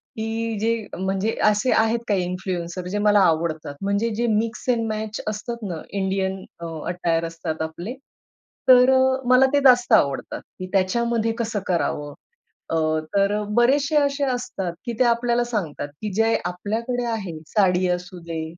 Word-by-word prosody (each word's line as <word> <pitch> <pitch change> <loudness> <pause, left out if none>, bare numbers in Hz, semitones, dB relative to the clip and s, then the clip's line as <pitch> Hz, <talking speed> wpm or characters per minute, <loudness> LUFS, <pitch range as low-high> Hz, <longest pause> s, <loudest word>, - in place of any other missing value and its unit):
की 225 0 -3
जे 230 +2 +1 0.2
म्हणजे 190 +4 -1 0.2
असे 210 +5 +1
आहेत 225 +1 +1
काही 195 -4 +1
इन्फ्लुएन्सर 180 -1 -4
जे 205 - -2
मला 205 - +5
आवडतात. 160 -4 +1
म्हणजे 200 +3 0
जे 235 +1 0
मिक्स 230 +3 -4
एंड 230 -2 +1
मॅच 215 0 -4
असतात 215 +2 -4
ना, 165 -3 -5
इंडियन 190 -1 -2 0.2
अ, 170 - -6 0.2
अटायर 170 -2 0
असतात 165 -1 -5
आपले. 170 +8 -4 0.8
तर 250 0 +8
अ, - - +5 0.3
मला 255 +1 +7
ते 285 - +5
जास्त 245 -2 +5
आवडतात. 140 -1 +2 0.2
की 185 - -5
त्याच्यामध्ये 225 +4 +1
कसं 220 -3 -1
करावं? 145 -4 -1 0.6
अ, - - -1 0.4
तर 200 +1 +3 0.2
बरेचशे 280 +5 +3
असे 280 0 +1
असतात 195 -8 -4
की 235 - -3
ते - - +6
आपल्याला 240 0 +2
सांगतात 180 -11 -3
की 210 - -3
जे 225 +1 +3
आपल्याकडे 225 +7 -2
आहे 195 -8 -4
साडी 185 -3 +2
असूदे 175 -2 -4
205 Hz, 150 wpm, -23 LUFS, 180-235 Hz, 0.8 s, तर